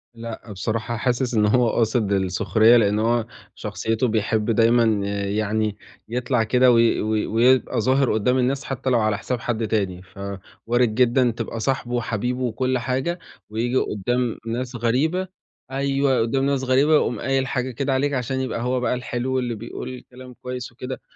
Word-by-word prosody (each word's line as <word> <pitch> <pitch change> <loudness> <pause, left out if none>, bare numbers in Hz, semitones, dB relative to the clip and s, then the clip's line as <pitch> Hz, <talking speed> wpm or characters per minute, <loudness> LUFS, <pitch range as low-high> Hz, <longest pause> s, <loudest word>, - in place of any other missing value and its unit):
لأ، 115 -1 -8
بصراحة 110 +4 -3
حاسِس 125 +1 0
إن 105 -2 +3
هو 120 +2 +3
قاصد 110 -2 +1
السُخرية، 100 +4 +4
لإن 105 -2 +2
هو 115 +1 +1 0.3
شخصيته 115 +2 -1
بيحب 110 0 0
دايمًا 115 +2 +4 0.4
يعني 105 +1 -1 0.3
يطلع 125 -1 0
كده 125 +3 +4
وي 115 -1 +3
وي 110 0 0
ويبقى 120 +1 +3
ظاهر 130 +2 +2
قُدام 125 +4 +2
الناس، 135 +2 0
حتى 135 0 -3
لو 125 -2 +3
على 110 -2 +1
حساب 125 -2 -3
حد 115 -1 -2
تاني، 95 -5 -1
ف 95 +1 -17 0.5
وارد 120 -2 +2
جدًا 125 0 +3
تبقى 115 0 -5
صاحبُه 125 0 -1
وحبيبُه 120 +2 -2
وكُلّ 130 +2 0
حاجة، 130 +8 -2 0.3
وييجي 115 +4 -2
قُدام 120 +3 -1
ناس 120 +2 -3
غريبة 140 +11 0 0.4
أيوه، 135 0 +1
قُدام 135 +4 0
ناس 140 -1 0
غريبة 130 +4 +3
ويقوم 135 -7 +2
قايل 135 0 0
حاجة 130 0 -2
كده 135 +2 -1
عليك، 140 +2 +1
عشان 130 0 -1
يبقى 125 -3 -3
هو 125 +1 0
بقى 125 - 0
الحلو 125 +1 -2
اللي 120 -2 -2
بيقول 125 +3 -7
كلام 125 0 -11
كويس 125 -1 -6
وكده، 130 +2 -7
120 Hz, 165 wpm, -23 LUFS, 110-130 Hz, 0.5 s, السُخرية